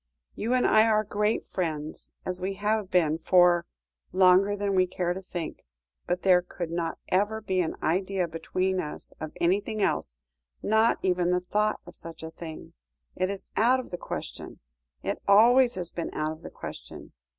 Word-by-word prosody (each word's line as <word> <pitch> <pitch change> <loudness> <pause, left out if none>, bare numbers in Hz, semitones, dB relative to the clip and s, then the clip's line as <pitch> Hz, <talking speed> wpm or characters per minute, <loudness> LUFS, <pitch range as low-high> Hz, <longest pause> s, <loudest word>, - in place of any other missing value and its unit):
"You 235 +4 -1
and 250 - +2
I 220 +1 +5
are 215 -1 +3
great 210 +1 0
friends, 155 -4 -4 0.2
as 180 0 -2
we 195 +1 -2
have 210 0 0
been 165 -4 +2
for 175 -1 +4 0.4
longer 190 +2 +5
than 200 -1 -1
we 185 -1 +3
care 175 -1 -1
to 190 - -6
think. 175 -3 -6 0.4
But 180 0 -1
there 180 -2 +5
could 175 -1 -6
not 170 -1 -2
ever 205 +4 +1
be 190 -4 0
an 165 - -2
idea 185 +2 0
between 185 +3 -1
us 150 - -5
of 155 -1 -4
anything 200 +5 +1
else, - - 0 0.4
not 220 +2 +3
even 180 -2 +2
the 180 0 +2
thought 210 +4 0
of 175 - -12
such 165 -1 -8
a 160 - -6
thing. 160 -1 -9 0.4
It 185 - 0
is 200 -1 -4
out 250 +4 +4
of 255 - -8
the 175 - -3
question. - - -6 0.4
It - - -3
always 240 +5 +6
has 180 -2 -3
been 170 - -4
out 155 0 -1
of 160 +1 -9
the - - -8
question. - - -9
185 Hz, 180 wpm, -27 LUFS, 175-205 Hz, 0.4 s, always